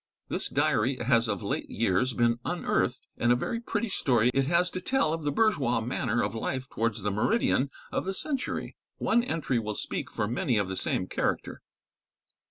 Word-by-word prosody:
This - - -2
diary 120 +5 +2
has 115 -1 +2
of 100 -3 -2
late - - -2
years 115 +4 +1
been 120 0 +2
unearthed, - - 0 0.2
and 120 - +3
a - - +6
very 230 - -2
pretty 235 -1 -2
story 125 - +3
it 135 -1 +2
has 170 +2 +2
to 185 - -4
tell 185 -7 +1
of 165 - -3
the 145 -1 0
bourgeois 145 - +2
manner 120 0 0
of - - -1
life 130 +3 -3
towards 115 -3 -2
the 105 - 0
meridian 135 - +2 0.2
of - - -1
the 190 0 -2
century. 275 +4 -2 0.2
One 235 +1 +2
entry 160 - 0
will 105 -2 -3
speak - - -3
for 105 - -2
many 120 +1 0
of 100 -2 0
the 95 - -3
same - - 0
character. - - -2
125 Hz, 185 wpm, -28 LUFS, 115-165 Hz, 0.2 s, a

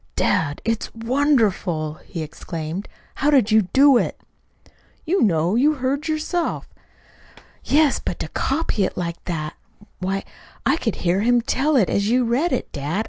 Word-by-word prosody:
"Dad, 145 -2 0
it's 225 0 -1
wonderful!" 225 - 0
he 165 -4 -5
exclaimed. 160 +4 -6 0.2
"How 285 - 0
did 260 -7 +4
you 215 -3 +4
do 275 -1 +6
it?" - - -3 0.9
"You 365 +4 +1
know. 170 -3 +2
You 290 +7 +3
heard 275 +3 -2
yourself." 320 +2 -2 1.0
"Yes; 300 0 +3
but - - -3
to - - -4
copy 270 -7 -1
it - - -2
like 170 -1 -4
that! 155 -4 -3 0.5
Why, 190 +1 -2 0.4
I 270 +5 +3
could 225 - -2
hear 175 +2 +3
him 240 +3 +3
tell 280 +5 0
it 220 -9 +4
as 200 +1 0
you 250 +2 +3
read 265 +9 +1
it, - - -2
dad. 150 +6 -3
225 Hz, 155 wpm, -22 LUFS, 175-280 Hz, 1.0 s, do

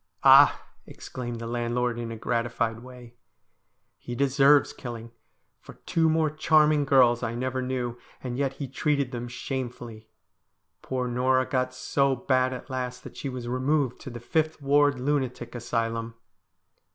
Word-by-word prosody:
' - - -33
Ah! - - +7
' - - -39
exclaimed 120 -2 -7
the 115 - -6
landlord, 120 +1 -1
in 115 -1 -5
a - - -5
gratified 115 0 -1
way, 125 -1 -13 0.4
' - - -49
he 120 - -4
deserves 140 +2 +4
killing, 115 -2 -8 0.5
for - - -14
two 165 -1 +2
more 160 -1 +2
charming 155 -1 +3
girls 125 -3 +4
I 115 -1 -3
never 130 +1 -2
knew, 125 -2 -3 0.2
and 125 -2 -5
yet 135 0 -1
he 140 0 -6
treated 140 0 -1
them 120 -1 -5
shamefully. 120 -3 -6 0.7
Poor 130 -1 -3
Norah 130 +1 +2
got 130 -1 -1
so 135 +1 0
bad 130 0 +1
at 125 - -7
last 125 -1 -4
that - - -11
she 140 - -5
was 125 -2 -6
removed 130 +1 0
to - - -8
the 120 -1 -8
Fifth 155 +7 -1
Ward 145 -1 +3
Lunatic 130 -3 -2
Asylum.' 115 -1 -3
125 Hz, 160 wpm, -26 LUFS, 120-135 Hz, 0.7 s, Ah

